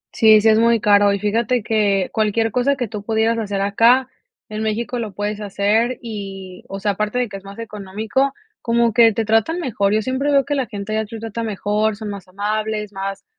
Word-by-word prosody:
Sí, 220 -1 +6
sí 220 - +4
es 220 - +5
muy 230 0 +4
caro, 205 -1 +4
y 200 - 0
fíjate 230 +3 0
que 200 -3 +1
cualquier 220 +1 +1
cosa 250 +5 +1
que 245 -4 -3
tú 210 0 -6
pudieras 225 +1 +1
hacer 200 -3 -2
acá, 230 +6 +4 0.4
en 215 0 -5
México 230 +3 -2
lo 215 -4 -5
puedes 205 +1 -3
hacer 210 +5 0
y, 195 -4 -7
o 195 - -5
sea, 205 +1 0
aparte 210 +4 -2
de 250 -1 +1
que 195 - -6
es 195 - -14
más 200 0 -11
económico, 220 +4 -2 0.3
como 235 -1 +1
que 230 0 +6
te 225 +1 -2
tratan 225 +11 +1
mejor. 205 - 0
Yo 215 0 +1
siempre 260 +4 -1
veo 275 -2 +3
que 290 - -2
la 270 -4 -1
gente 205 -1 -6
de 220 - +1
allá 220 - -3
te 225 +1 -8
trata 225 +1 -5
mejor, 210 0 -1
son 215 0 -7
más 195 -2 -9
amables, 210 +2 -3
más 195 0 -5
215 Hz, 220 wpm, -20 LUFS, 205-230 Hz, 0.4 s, Sí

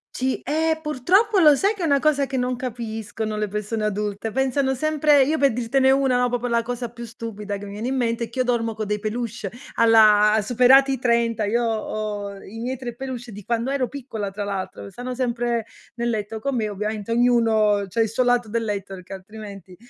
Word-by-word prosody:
Sì. 260 +1 -1
Ehm, 315 +2 0
purtroppo 365 - +2
lo 305 -4 +7
sai 400 +10 +2
che 380 - -5
è - - +2
una 280 -3 +3
cosa 285 -1 +2
che 265 0 -4
non 250 0 0
capiscono 225 -3 -4
le 210 0 -1
persone 210 +2 -3
adulte, 210 +1 -2
pensano 265 +2 +1
sempre 300 +1 +3
io 305 +4 +1
per 280 -4 +3
dirtene 260 +3 +2
una, 260 -2 +3
proprio 245 0 -2
la 235 -1 +2
cosa 245 0 -4
più 235 0 -8
stupida 210 -3 -6
che 200 - -9
viene 205 +4 -5
in 265 - -1
mente, 235 -2 -1
che 235 - -7
io 255 - +2
dormo 230 -2 0
con 220 0 -4
dei 210 0 -2
peluche 220 -1 -4 0.2
alla 215 -2 +6
superati 255 +5 +5
i 265 - -3
30, 235 -3 +1
io 235 +4 +1
ho 215 -2 -3
i 220 - -10
miei 255 +3 -3
3 240 -2 -6
peluche 245 -2 -6
di 205 0 -9
quando 235 +4 -1
ero 270 -2 0
piccola 235 -7 -5
tra 205 +1 -4
l'altro, 200 -1 -5
stanno 245 +6 -6
sempre 240 -2 -1 0.3
nel 235 0 -1
letto 220 -1 -3
con 275 +4 -2
me, 220 -3 0
ovviamente 210 +1 -4
ognuno 225 -4 +3
c'ha 210 +5 -1
il 225 - +1
suo 240 +4 +1
lato 245 -2 +2
del 230 +2 -1
letto 200 -2 -4
perché 185 0 -10
altrimenti, 195 -1 -10
235 Hz, 205 wpm, -23 LUFS, 210-255 Hz, 0.3 s, lo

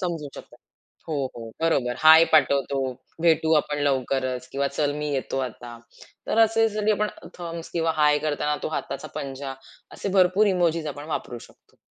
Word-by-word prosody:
समजू 165 -5 -3
शकतात. - - -12 0.5
हो, 160 - -3 0.2
हो, 115 - -7 0.2
बरोबर. 135 -7 +1
हाय 160 +1 +8
पाठवतो, 140 -3 +3 0.4
भेटू 160 -1 +3
आपण 150 0 -5
लवकरच, 130 -2 -1
किंवा 140 0 0
चल, 145 -1 +1
मी 150 - -3
येतो 135 0 -2
आता. 120 0 -11 0.5
तर 225 - 0
असे 225 0 +4 0.3
आपण 210 +1 0 0.3
थंब्स 170 -1 -7
किंवा 165 -1 0
हाय 150 0 +4
करताना 150 0 -1
तो - - -2
हाताचा 155 - -5
पंजा, 135 0 -5 0.4
असे - - -5
भरपूर 185 +4 +4
इमोजीज 170 -4 +1
आपण 145 +1 -9
वापरू 120 - -5
शकतो. - - -27
150 Hz, 155 wpm, -24 LUFS, 135-170 Hz, 0.5 s, हाय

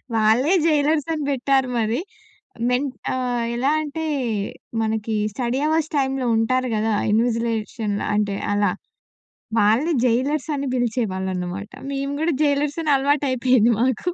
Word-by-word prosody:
వాళ్ళే 225 - +3
జైలర్స్ 300 -1 +2
అని 310 - -3
బెట్టారు 265 -1 +1
మరి. 225 +3 0 0.7
మెన్ 250 +3 +1 0.2
ఆహ్, 245 -2 -1
ఎలా 255 +4 +1
అంటే 310 +2 -4 0.8
మనకి 220 0 -1 0.2
స్టడీ 245 +4 -1
అవర్స్ 315 0 +1
టైమ్‌లో 270 -2 0
ఉంటారు 255 +3 +1
గదా! 220 +1 0 0.2
ఇన్విజిలేషన్‌లో 225 -2 -1
అంటే 205 -1 0 0.2
అలా. 205 0 +2 0.9
వాళ్ళని 225 +11 +3
జైలర్స్ 260 +5 +1
అని 280 0 -2
పిలిచేవాళ్ళన్నమాట. 190 -6 -2 0.2
మేము 275 0 -2
గూడా 330 +2 +1
జైలర్స్ 290 +1 +1
అని 310 - 0
అలవాటైపోయింది 260 -4 +2
మాకు. 260 +7 0
250 Hz, 120 wpm, -22 LUFS, 220-280 Hz, 0.9 s, వాళ్ళే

